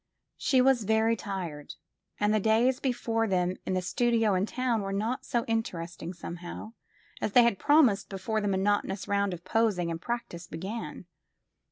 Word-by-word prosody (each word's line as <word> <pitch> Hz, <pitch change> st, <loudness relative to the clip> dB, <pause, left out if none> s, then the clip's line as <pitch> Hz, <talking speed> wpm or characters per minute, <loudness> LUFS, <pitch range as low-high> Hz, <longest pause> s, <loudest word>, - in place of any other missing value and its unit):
She 260 Hz, -3 st, +3 dB
was 255 Hz, -3 st, +4 dB
very 220 Hz, +2 st, +3 dB
tired, 180 Hz, -8 st, -6 dB, 0.4 s
and 210 Hz, +1 st, +2 dB
the 215 Hz, -, +3 dB
days 230 Hz, +5 st, +3 dB
before 230 Hz, -4 st, 0 dB
them 180 Hz, -1 st, 0 dB
in 185 Hz, -, 0 dB
the 185 Hz, -, -1 dB
studio 225 Hz, +1 st, +2 dB
in 190 Hz, +2 st, +1 dB
town 250 Hz, -3 st, 0 dB
were 195 Hz, 0 st, -4 dB
not 225 Hz, +7 st, -2 dB
so 235 Hz, -1 st, 0 dB
interesting, 175 Hz, -7 st, -3 dB
somehow, 175 Hz, +4 st, -8 dB, 0.5 s
as 205 Hz, -, -1 dB
they 245 Hz, -, +8 dB
had 235 Hz, -5 st, +2 dB
promised 270 Hz, -10 st, +4 dB
before 210 Hz, +3 st, -2 dB
the 205 Hz, -, -1 dB
monotonous 195 Hz, 0 st, 0 dB
round 200 Hz, -1 st, +1 dB
of 175 Hz, -1 st, -7 dB
posing 190 Hz, -5 st, +1 dB
and 165 Hz, 0 st, -5 dB
practice 210 Hz, -7 st, -4 dB
began. 190 Hz, +5 st, -6 dB
210 Hz, 165 wpm, -29 LUFS, 185-230 Hz, 0.5 s, they